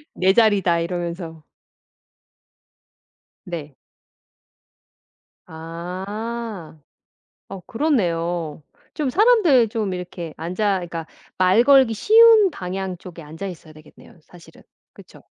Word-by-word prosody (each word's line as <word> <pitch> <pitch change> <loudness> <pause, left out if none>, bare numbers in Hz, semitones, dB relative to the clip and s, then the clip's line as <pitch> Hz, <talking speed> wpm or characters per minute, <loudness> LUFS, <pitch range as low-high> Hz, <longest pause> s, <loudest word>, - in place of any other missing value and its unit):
"내 190 +1 +3
자리다." 200 -7 +3
이러면서. 170 -2 -5 2.0
네. 155 -6 -7 1.7
아. 185 +4 -7 0.7
어. 195 - -8
그렇네요. 175 - -1 0.3
좀 295 -3 -2
사람들 370 - +4
좀 210 -4 -3
이렇게 175 -3 -7
앉아 185 +4 -1
그러니까 165 -2 -6 0.3
말 185 +5 +4
걸기 265 -4 +5
쉬운 440 - +6
방향 190 - -5
쪽에 170 -2 -11
앉아 160 +6 -8
있어야 160 -4 -10
되겠네요 155 +2 -18
사실은, 175 0 -18 0.3
그쵸? - - -17
185 Hz, 205 characters per minute, -21 LUFS, 170-225 Hz, 2.0 s, 쉬운